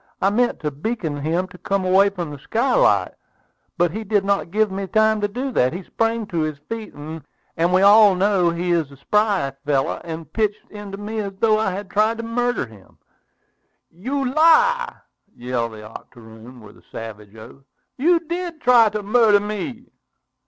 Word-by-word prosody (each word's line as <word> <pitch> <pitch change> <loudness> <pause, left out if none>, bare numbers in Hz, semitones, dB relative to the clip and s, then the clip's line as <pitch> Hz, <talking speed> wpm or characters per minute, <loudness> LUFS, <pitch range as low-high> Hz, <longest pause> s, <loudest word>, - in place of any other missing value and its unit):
I 195 - +2
meant 240 +3 +1
to 150 -1 -2
beckon 160 0 -4
him 165 +6 -1
to 180 - -14
come 195 +1 -1
away 190 +2 +4
from 175 -6 -6
the 145 - -9
skylight, 265 - +2 0.6
but 175 -1 +2
he 220 +5 -5
did 205 -1 0
not 200 -3 0
give 215 +2 +1
me 195 0 -4
time 220 +1 +2
to 205 - +1
do 255 +6 -4
that. 130 - +1
He 185 +2 -6
sprang 225 +3 -1
to 170 -4 -3
his 155 -2 -2
feet, 225 -1 -6
and 160 +3 -5
we 185 +1 +3
all 205 -1 +7
know 190 -2 +2
he 175 +1 -2
is 165 -4 +1
a 140 - -14
spry 200 -2 +1
fellow, 140 -2 0
and 165 -1 -8
pitched 215 -2 -1
into 205 -2 -8
me 215 +2 -5
as 200 -2 -4
though 215 -1 +3
I 220 - +1
had 190 +1 -6
tried 215 +2 +2
to 230 - -5
murder 245 +2 -1
him." 105 -4 -18 0.9
"You 260 +9 -3
lie!" 475 - +4 0.4
yelled 120 -2 -3
the 110 0 -10
octoroon, 115 +2 -13
with 105 -1 -15
a - - -25
savage 105 -2 -9
oath. 110 +5 -13 0.4
"You 335 +5 +3
did 340 0 -5
try 240 -5 +5
to 210 0 -4
murder 215 0 +4
me!" 215 +4 -5
200 Hz, 180 wpm, -21 LUFS, 160-225 Hz, 0.9 s, all